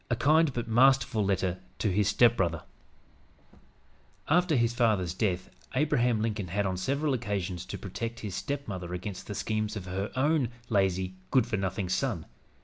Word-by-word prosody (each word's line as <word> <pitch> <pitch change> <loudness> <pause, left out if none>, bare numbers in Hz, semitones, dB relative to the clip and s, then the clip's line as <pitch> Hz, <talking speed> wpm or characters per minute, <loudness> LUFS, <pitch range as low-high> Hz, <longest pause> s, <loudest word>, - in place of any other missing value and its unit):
A 120 - +2
KIND 155 +4 +4
BUT 120 -2 -3
MASTERFUL 120 -1 +4
LETTER 95 -2 0 0.2
TO 105 - 0
HIS 100 +2 +2
STEPBROTHER 100 -7 +3 1.6
After 175 0 +3
his 120 -2 +2
father's 105 -8 +2
death 95 -2 -1 0.2
Abraham 125 -6 +2
Lincoln 105 -4 -2
had, 100 +4 -1
on 95 -1 0
several 140 +10 0
occasions, 100 -7 -2
to - - -5
protect 115 +4 -5
his 105 -3 -5
stepmother 95 - -4
against 95 +1 -6
the 105 - -5
schemes 110 0 -2
of 100 -4 -5
her 95 +3 -3
own 140 -1 +2 0.2
lazy, 95 -3 +1 0.2
good 130 -4 +4
for 115 -2 -2
nothing 95 0 -2
son. 90 - -1
105 Hz, 155 wpm, -29 LUFS, 95-125 Hz, 1.6 s, KIND